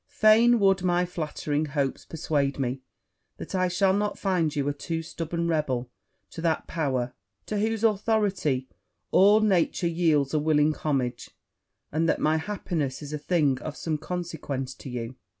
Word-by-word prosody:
Fain 225 +3 +5
would 195 -2 +3
my 180 0 +2
flattering 155 -3 -2
hopes 140 -2 -2
persuade 145 -3 -1
me 130 -1 -2 0.6
that - - -8
I 185 -1 +2
shall 190 +2 +2
not 205 +1 -1
find 175 -6 0
you 140 -1 0
a 145 - +1
too 165 +3 -4
stubborn 170 +1 -3
rebel 130 -7 -1 0.4
to 165 - -7
that 160 -1 0
power, 130 -6 -2 0.3
to 210 - -2
whose 220 +1 -1
authority 205 - +1 0.4
all 205 +3 +6
nature 190 -3 +2
yields 160 -5 +2
a 155 - +3
willing 150 0 +3
homage, 130 -6 -2 0.6
and 160 +2 +1
that - - +1
my 155 +1 +2
happiness 160 -6 -3
is 145 +1 -7
a 150 - -3
thing 145 -5 +1
of 155 - -6
some 155 -2 -2
consequence 160 -7 -4
to 135 - -10
you. 120 -1 -5
160 Hz, 160 wpm, -26 LUFS, 145-185 Hz, 0.6 s, all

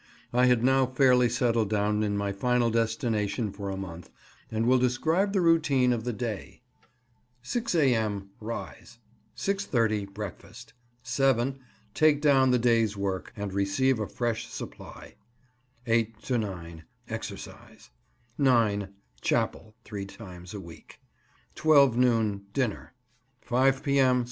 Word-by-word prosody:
I 125 +1 +4
had 125 -2 +3
now 130 0 +4
fairly 125 -1 +4
settled 115 -3 +1
down 105 0 +1
in 105 -1 0
my 100 0 -1
final 120 +3 +1
destination 115 -1 -1
for 100 0 -6
a 95 - -4
month, 90 -3 -8 0.4
and 110 +1 -1
will 130 +1 +4
describe 160 +11 +1
the 195 -2 +1
routine 150 -7 +3
of 115 -1 -4
the 125 - -1
day:— 115 -2 -5 0.8
6 230 - -2
A.M. 110 - +1
—Rise. 115 +2 -7 0.4
6.30 115 - 0
„ - - -22
—Breakfast. 110 +3 -9 0.3
7 130 +1 +1 0.2
„ 110 -1 -34
—Take 155 -2 +4
down 135 -3 +4
the 125 - +4
day's 115 -3 +2
work, 95 -2 -3
and 100 -2 -4
receive 110 +6 +1
a 105 - -2
fresh 120 -2 -2
supply. - - -10 0.7
8 115 -2 0
to 125 -3 0
9 85 -6 -6
„ - - -40
—Exercise. - - -8 0.5
9 110 -7 +2 0.2
„ - - -33
—Chapel 110 0 -1
(three 100 -2 -6
times 90 -2 -11
a - - -5
week). 85 -3 -13 0.5
12 140 -6 +5
noon 115 -5 +1
—Dinner. 125 -2 -2 0.5
5 135 +2 +2
P.M. 135 -3 +3
115 Hz, 140 wpm, -27 LUFS, 105-130 Hz, 0.8 s, 12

